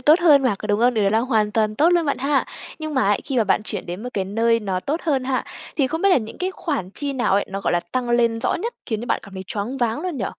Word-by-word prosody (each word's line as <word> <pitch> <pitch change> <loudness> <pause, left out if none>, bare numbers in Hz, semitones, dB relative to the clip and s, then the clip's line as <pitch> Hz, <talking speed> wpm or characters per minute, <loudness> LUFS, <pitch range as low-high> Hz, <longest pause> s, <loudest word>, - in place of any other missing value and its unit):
tốt 305 +7 +5
hơn 300 -5 +6
mà, 255 -5 +2
có - - -6
đúng 205 0 +1
hông? 245 +1 +4
Điều 215 -2 +2
đấy 195 - +3
là 220 - +3
hoàn 220 -4 +1
toàn 215 -1 +1
tốt 305 +7 +4
luôn 340 -3 +2
bạn 280 - 0
ha! 275 +1 +1 0.3
Nhưng 310 -1 -5
mà 260 - +2
ấy, 205 - +2
khi 270 - -3
mà 225 - +3
bạn 205 +1 +2
chuyển - - -5
đến 180 +4 -6
một 250 - -4
cái 195 -2 0
nơi 230 +3 +1
nó 190 -3 -2
tốt 300 - -2
hơn 275 -6 0
ha, 260 -1 -1 0.3
thì 275 - +3
không 320 +6 -3
biết 395 - +5
là 375 - +5
những 220 -4 -4
cái 370 +1 -1
khoản 285 - -3
chi 280 +5 -4
nào 250 -6 0
ấy, 200 +1 +3
nó, 195 +1 -4
gọi - - 0
là, 175 - +2
tăng 240 +8 -3
lên 235 -1 +2
rõ - - +1
nhất 465 +7 -3
khiến 220 -4 -2
cho 240 - -6
bạn - - 0
cảm 200 -1 -12
thấy 190 - -6
choáng 215 +6 -3
váng 240 +3 0
luôn 360 -2 -3
nhỉ? 210 - -2
240 Hz, 325 wpm, -22 LUFS, 210-285 Hz, 0.3 s, hơn